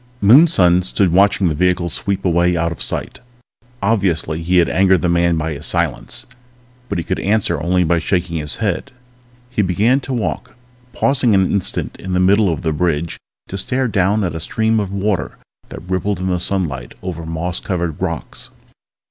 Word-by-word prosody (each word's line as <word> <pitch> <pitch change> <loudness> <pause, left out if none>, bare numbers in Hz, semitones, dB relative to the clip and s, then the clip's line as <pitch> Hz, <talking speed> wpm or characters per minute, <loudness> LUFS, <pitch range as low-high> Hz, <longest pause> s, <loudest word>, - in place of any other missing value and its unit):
_ - - -31 0.2
Moonson 100 - +5
stood 95 0 +1
watching 100 0 +4
the 80 - +1
vehicle 90 +2 +1
sweep 95 +4 -3
away 85 0 +2
out 85 0 0
of 85 - -7
sight. - - -2 0.6
Obviously 90 -7 0
he 90 +2 +1
had 85 - +4
angered 95 -1 +3
the 90 - +2
man 85 -1 +2
by 80 0 -2
his 75 +2 -4
silence, 85 -6 -2 0.6
but 100 - -2
he 85 - -2
could 95 - -2
answer 100 -7 0
only 90 +2 +2
by 85 0 +2
shaking 85 0 -1
his 75 -1 -3
head. 105 +5 -2 0.6
He 115 - +1
began 105 +8 +2
to 135 - -7
walk, 110 -10 -3 0.4
pausing 125 -4 +2
an 95 -1 +2
instant 100 -3 -1
in 95 0 -5
the 90 - +2
middle 100 +1 +4
of 80 - -4
the 80 -2 0
bridge 85 0 -1 0.3
to 95 - -4
stare 130 +6 0
down 100 0 +1
at 90 - -2
a 80 - -4
stream 110 +6 0
of 100 -2 -3
water 100 -1 -2 0.3
that 90 - -10
rippled 95 +2 -1
in 95 +1 -2
the 90 - 0
sunlight 85 -9 -3
over 85 -3 -5
moss 80 +2 -3
covered 85 -4 -3
rocks. 85 -4 -4
90 Hz, 185 wpm, -18 LUFS, 85-100 Hz, 0.6 s, Moonson